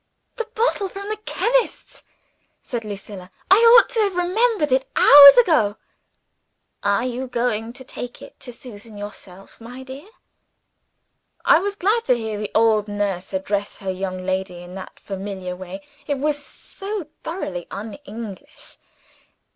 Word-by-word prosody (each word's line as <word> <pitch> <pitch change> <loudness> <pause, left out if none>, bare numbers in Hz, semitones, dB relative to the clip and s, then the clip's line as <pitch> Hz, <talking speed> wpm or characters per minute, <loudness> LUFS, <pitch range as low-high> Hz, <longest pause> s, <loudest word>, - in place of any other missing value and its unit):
"The 460 -2 -3
bottle 440 -4 0
from 400 +2 -8
the 430 - -3
chemist's," - - -1 0.6
said 240 -2 -4
Lucilla. 200 -3 -8 0.2
"I 385 - +9
ought 465 +1 +7
to - - -2
have 400 -4 +1
remembered 365 - +1
it 265 +1 +1
hours 280 0 +10
ago." 310 - +4 1.1
"Are 200 +4 +1
you 255 +1 -4
going 235 -2 -1
to 260 - -11
take 245 -1 -8
it - - -14
to 250 - -7
Susan 225 -3 -11
yourself, 195 -1 -11
my 250 +3 -9
dear?" 270 +8 -10 1.4
I - - +6
was 400 +2 -3
glad 420 +4 +1
to 250 - +3
hear 220 -2 -4
the 210 - -4
old 220 -2 +3
nurse 200 -3 -3
address 200 +2 -2
her 195 -2 -4
young 185 -1 -5
lady 185 -2 -3
in 175 +1 -11
that 190 0 -10
familiar 190 -2 -6
way. 185 +1 -9 0.2
It 285 -1 -1
was 290 +1 -1
so 395 +4 -7 0.2
thoroughly 185 - -5
un 210 +2 -7
English. 225 -7 -9
235 Hz, 145 wpm, -22 LUFS, -, 1.4 s, hours